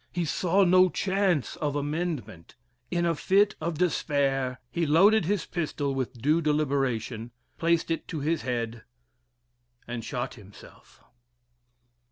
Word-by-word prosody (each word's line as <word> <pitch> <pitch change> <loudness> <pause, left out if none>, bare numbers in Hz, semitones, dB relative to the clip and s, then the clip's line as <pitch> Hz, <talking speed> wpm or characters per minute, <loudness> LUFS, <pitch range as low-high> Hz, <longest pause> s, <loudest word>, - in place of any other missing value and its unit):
He 175 -1 -1
saw 185 +5 +2
no 185 0 +5
chance 190 - 0
of 145 -2 -2
amendment. 145 - -4 0.3
In 175 -1 0
a 170 - +2
fit 200 +6 +3
of 165 0 -2
despair, 135 -6 0
he 170 +3 -1
loaded 195 +6 +5
his 200 +1 0
pistol 150 -5 -2
with 130 -2 -4
due 150 +7 +2
deliberation, 135 -7 -1 0.3
placed 165 0 +1
it 165 - -2
to 160 - -4
his 155 +3 0
head, 115 -2 -3 1.1
and 120 -1 -5
shot 125 0 -4
himself. 105 -3 -16
150 Hz, 130 wpm, -27 LUFS, 130-175 Hz, 1.1 s, no